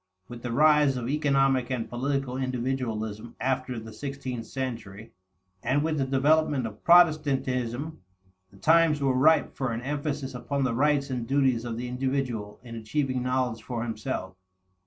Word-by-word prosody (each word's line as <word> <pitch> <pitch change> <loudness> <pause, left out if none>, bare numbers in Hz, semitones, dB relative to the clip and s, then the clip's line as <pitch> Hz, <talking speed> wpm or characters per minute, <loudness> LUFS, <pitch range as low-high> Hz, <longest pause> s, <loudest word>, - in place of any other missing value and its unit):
With 120 -1 -9
the 120 - -4
rise 150 0 +4
of 120 -1 -3
economic 135 -3 +2
and 125 -3 -2
political 135 +1 -2
individualism 120 -4 -3
after 130 -2 -1
the 110 0 -10
sixteenth 130 -2 -5
century, 115 -5 -6 0.5
and 135 +5 +1
with 155 -1 0
the 135 - 0
development 140 0 +2
of 110 -1 -8
Protestantism, 145 -5 +3 0.5
the - - -19
times 165 -2 +4
were 135 -2 +2
ripe 150 +4 +3
for 130 -3 -2
an 115 +1 -3
emphasis 145 -1 -3
upon 140 +2 -2
the 130 -2 0
rights 140 +2 +1
and 120 -3 -3
duties 130 -4 +2
of 115 -1 -4
the 125 +1 -4
individual 125 -5 -2
in 120 -2 -9
achieving 130 +3 -2
knowledge 125 -3 -1
for 115 -1 -4
himself. 110 -4 -4
130 Hz, 155 wpm, -27 LUFS, 120-140 Hz, 0.5 s, rise